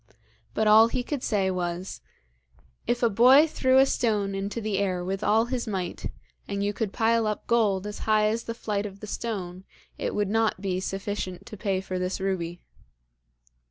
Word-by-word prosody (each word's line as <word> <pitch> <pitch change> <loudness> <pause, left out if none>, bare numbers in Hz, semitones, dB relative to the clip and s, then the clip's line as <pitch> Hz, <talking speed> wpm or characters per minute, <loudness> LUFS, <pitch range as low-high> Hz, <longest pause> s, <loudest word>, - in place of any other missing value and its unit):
But 220 - +1
all 215 +1 +7
he 245 +2 -2
could 280 +1 -3
say 195 -5 +1
was: 180 0 -4 0.9
'If 240 0 0
a - - +6
boy 255 +8 +7
threw 260 -4 +2
a 270 - +7
stone 210 -6 0
into 195 +3 -3
the 210 -3 -1
air 185 -3 -1
with 195 +2 -3
all 220 +2 +3
his 245 -1 -3
might, 185 -4 -3 0.4
and 200 0 -2
you 205 0 0
could 215 -2 -2
pile 230 0 +2
up 210 - -3
gold 205 -5 +2
as 210 0 -6
high 215 0 +4
as 225 +2 0
the 230 - -4
flight 210 -3 -2
of 195 0 -12
the 210 - -7
stone, 190 -5 -5 0.4
it - - -2
would 205 -1 0
not 225 -3 +1
be 185 -2 -2
sufficient 195 -1 -4
to - - -9
pay 195 -2 -1
for 185 -1 -4
this 180 +2 -2
ruby.' 175 -3 -2
205 Hz, 190 wpm, -26 LUFS, 190-225 Hz, 0.9 s, all